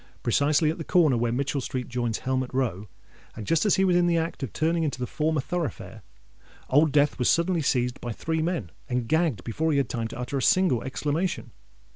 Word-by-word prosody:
Precisely 145 +5 +2
at 165 - -7
the - - -3
corner 160 -5 +3
where 120 0 0
Mitchell 140 +3 -1
Street 125 0 -4
joins 120 -2 -2
Helmet 130 -1 -2
Row, 110 -6 -1 0.5
and 110 - -7
just 165 - +2
as 205 - +4
he 190 0 +3
was 180 -2 +3
in 175 0 +3
the 170 -1 +2
act 165 -1 -2
of 135 - -4
turning 165 +2 0
into 150 -5 -1
the 125 - -1
former 155 +3 -1
thoroughfare, 170 -1 -4 0.7
Old 145 +3 +4
Death 145 0 +2
was 125 - +2
suddenly 170 0 +2
seized 125 -3 0
by 120 - -4
three 160 +8 -2
men, 160 - -2 0.2
and 125 -2 -1
gagged 155 - +1
before 160 +9 -1
he 145 - +2
had 135 -4 +1
time 115 -2 -2
to - - -9
utter 125 +3 -3
a - - -1
single 180 -6 +3
exclamation. 150 +7 -2
145 Hz, 215 wpm, -26 LUFS, 125-165 Hz, 0.7 s, as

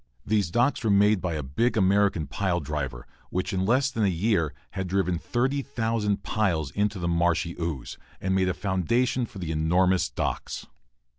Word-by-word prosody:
These 105 -5 +1
docks 120 +8 +1
were 110 - +1
made 100 0 +4
by 85 -3 -2
a 75 - -3
big 115 - 0
American 100 -4 +3
pile 90 +5 -1
driver, 65 -5 -4 0.2
which 90 +1 -2
in 95 0 0
less 130 +4 +3
than 115 -4 -1
a - - +4
year 90 -3 +1 0.2
had 95 -1 -3
driven 90 -2 0
30,000 115 -4 -1
piles 85 -10 0
into 105 0 0
the 85 -2 -2
marshy 85 0 +1
ooze, 80 -7 -4 0.2
and 95 - -1
made 95 -1 +2
a 90 - -1
foundation 115 +7 0
for 100 - -11
enormous 85 +3 +2
docks. - - -3
95 Hz, 165 wpm, -26 LUFS, 85-110 Hz, 0.2 s, made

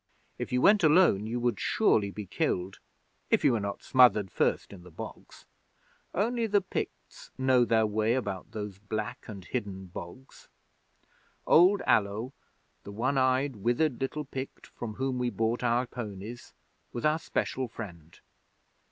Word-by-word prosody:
If - - -4
you 125 0 +1
went 210 -2 +6
alone 155 - +5
you 120 +2 -2
would 120 -4 0
surely 100 -2 +2
be 105 +1 -7
killed, 95 0 -2 0.5
if - - +2
you 140 - +6
were 115 - +1
not 100 0 -4
smothered 120 -7 +5
first - - 0
in 95 - -11
the 90 - -13
bogs. 80 - -10 0.7
Only 230 +4 +1
the 205 -1 +3
Picts 185 - -6
know 130 -2 +4
their 110 -1 +3
way 110 +2 +1
about 95 -8 -3
those 105 -3 -6
black 105 +1 -5
and 100 -4 -8
hidden 100 -6 -4
bogs. 90 +8 -11 1.0
Old 185 +4 +5
Allo, 110 +5 +1 0.5
the 100 - -9
one 125 +6 0
eyed, 130 0 +1
withered 120 +6 0
little 150 +3 -2
Pict 135 0 -7
from 110 -3 -7
whom 130 0 -2
we 125 0 0
bought 115 +1 -1
our 120 +1 +2
ponies, 110 -1 -8 0.4
was 120 - -4
our 155 +1 +3
special 130 -4 -2
friend. 85 -8 -10
120 Hz, 150 wpm, -29 LUFS, 105-130 Hz, 1.0 s, went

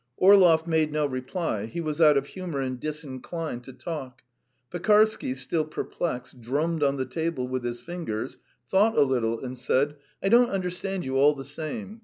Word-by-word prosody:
Orlov 180 -5 +6
made 160 -2 +1
no 150 0 +1
reply. 130 - -3
He 115 - -6
was 155 -1 -2
out 150 -3 +7
of 140 - 0
humour 180 -6 -5
and 130 -2 -3
disinclined 150 -1 -5
to 130 - -10
talk. 130 -2 -7 0.5
Pekarsky, 210 -4 +3
still 135 +5 -1
perplexed, 150 -4 -4
drummed 150 +7 -1
on 140 -1 +2
the 130 - -1
table 135 0 -2
with 130 -1 -3
his 120 0 -3
fingers, 160 -10 -5 0.3
thought 210 +4 +4
a - - +7
little, 115 -4 0
and 130 0 -6
said: 140 +4 +1 0.3
"I 195 - +2
don't 240 +2 +6
understand 185 0 -3
you, 130 0 -1
all 145 +2 +5
the 135 - -7
same. 195 - -6
150 Hz, 175 wpm, -26 LUFS, 130-175 Hz, 0.5 s, out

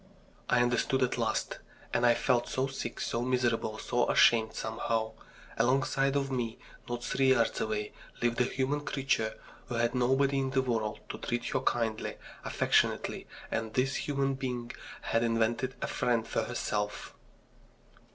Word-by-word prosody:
I 120 -1 +4
understood 125 +2 +1
at 125 - 0
last. - - -1 0.3
And 120 - +4
I 120 - +5
felt 120 0 +1
so 130 - 0
sick, 135 -3 -5
so 115 - -1
miserable, 120 -3 0
so 120 +2 0
ashamed, 110 -1 +5
somehow. 110 0 -1 0.5
Alongside 135 +2 +2
of 135 -1 0
me, 120 -3 -2 0.3
not 120 0 -3
three 135 -1 +2
yards 115 -3 +1
away, 105 -1 -2 0.3
lived 120 0 +1
a - - +4
human 135 +3 0
creature 135 -6 0 0.3
who 120 - -4
had 120 0 +1
nobody 135 +2 +2
in 135 -1 0
the 130 0 +1
world 110 -4 -1
to - - -5
treat 120 0 -2
her - - +1
kindly, 115 -2 -1 0.3
affectionately, - - +1 0.2
and 110 -1 -2
this 130 +1 +1
human 140 -1 +1
being 125 -3 -4 0.3
had 115 - +1
invented 115 +2 +1
a - - 0
friend 115 -2 0
for - - -1
herself! 105 -1 -3
120 Hz, 150 wpm, -31 LUFS, 115-130 Hz, 0.5 s, I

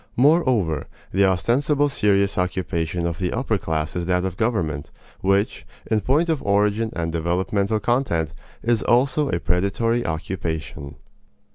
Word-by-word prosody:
Moreover, 125 - +3 0.2
the 100 +2 +3
ostensible 130 - +2
serious 100 -7 +2
occupation 90 -3 -1
of 85 +1 -2
the 90 -2 -1
upper 115 -4 0
class 80 -1 -2
is 90 -1 -2
that 90 0 +1
of 95 -2 -3
government, 85 -11 -1 0.3
which, 100 +2 +1 0.3
in 110 -1 +3
point 145 - +2
of 160 -4 0
origin 105 +2 +1
and 80 -1 -2
developmental 95 +6 0
content, 105 - 0 0.3
is 115 -1 +2
also 135 +4 +2
a 85 - 0
predatory 100 +8 0
occupation. 80 -4 -4
100 Hz, 135 wpm, -23 LUFS, 85-120 Hz, 0.3 s, Moreover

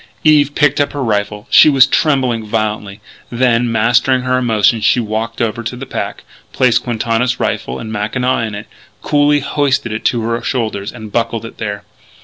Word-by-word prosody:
Eve 145 -2 +4
picked 145 -1 +2
up 145 - -1
her 145 -2 -3
rifle. 105 -1 -2
She - - +7
was 135 -3 +6
trembling 130 -7 +1
violently. 105 -2 -3 0.3
Then, 120 -1 +1
mastering 120 +3 +2
her 130 0 +1
emotion, 115 -2 +2
she 125 - +3
walked 115 +1 -3
over 115 0 -1
to 115 +2 -5
the 130 +2 -7
pack, - - -5 0.3
placed 125 -2 +2
Quintana's 120 +1 -1
rifle 65 - -2
and 110 - -7
mackinaw 120 +5 -1
in 110 -3 -3
it, 105 - -7 0.4
coolly 145 0 +2
hoisted 135 -4 0
it 110 - -4
to 120 - +1
her 115 +1 -2
shoulders 110 -5 -3
and 110 -3 -10
buckled 115 0 -2
it 115 - -11
there. 100 -1 -4
115 Hz, 175 wpm, -15 LUFS, 110-130 Hz, 0.4 s, She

